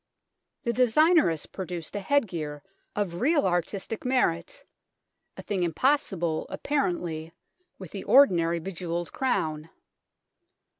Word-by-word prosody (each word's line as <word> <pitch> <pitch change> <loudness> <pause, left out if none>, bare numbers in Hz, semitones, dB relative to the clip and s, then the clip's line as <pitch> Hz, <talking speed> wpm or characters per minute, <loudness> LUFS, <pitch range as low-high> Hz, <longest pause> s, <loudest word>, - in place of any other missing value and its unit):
The 235 - 0
designer 305 - +4
has 160 -2 -3
produced 180 -3 -6
a - - -1
headgear 175 - -1 0.3
of 185 -4 -2
real 295 +2 +3
artistic 190 +4 -2
merit 250 - 0 0.7
(a - - -8
thing 200 -3 -2
impossible, 175 - 0
apparently, 175 - -2 0.4
with - - -10
the - - -6
ordinary 170 -11 +5
bejewelled 175 -1 -4
crown). 160 - -1
180 Hz, 105 wpm, -27 LUFS, 165-250 Hz, 0.7 s, ordinary